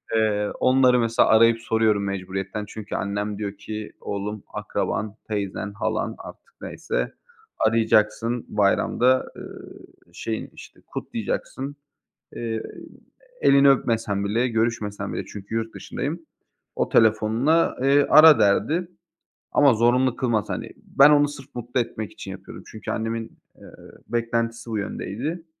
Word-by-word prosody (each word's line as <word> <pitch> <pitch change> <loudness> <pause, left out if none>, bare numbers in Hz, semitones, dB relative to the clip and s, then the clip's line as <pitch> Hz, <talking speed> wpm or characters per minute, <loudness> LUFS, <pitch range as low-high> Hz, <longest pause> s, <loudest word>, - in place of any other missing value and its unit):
Eee, 105 -2 +1
onları 130 -1 +4
mesela 115 0 +2
arayıp 115 +1 +5
soruyorum 110 -3 +1
mecburiyetten 95 +1 -4
çünkü 105 0 -7
annem 100 +1 -2
diyor 100 -1 -5
ki 105 +1 -7
"Oğlum, 100 +1 -4
akraban, 105 -1 -3
teyzen, 100 -1 -3
halan, 105 - -2
artık - - -13
neyse, - - -3 0.5
arayacaksın, 115 +1 +1
bayramda, 125 +5 +2
ııı, - - -11 0.3
şeyini, 110 -1 -4
işte, - - -14
kutlayacaksın." 140 +2 -4 0.6
Eee, 115 -1 -3 0.8
elini 140 0 +6
öpmesen 110 -6 +1
bile, 115 +5 +1
görüşmesen 115 -3 -2
bile, - - -4
çünkü 100 +2 -8
yurt 115 0 -2
dışındayım, 160 +4 -5 0.5
o - - -1
telefonla, 115 +9 +3
eee, 140 +1 +4
ara 155 -1 +8
derdi. 150 - +2 0.6
Ama 140 -4 +5
zorunlu 120 +3 +2
kılmaz, 115 -6 -1
hani, - - -4
ben 140 +2 +5
onu 145 -1 +5
sırf 145 -2 -10
mutlu 120 +1 -2
etmek 110 -2 -4
için 95 - -8
yapıyorum 95 0 -10
çünkü 110 - -6
annemin, 115 0 -4 0.2
eee, - - -13 0.4
beklentisi 115 0 -2
bu 110 - -2
yöndeydi. 135 - -4
115 Hz, 125 wpm, -24 LUFS, 105-125 Hz, 0.8 s, ara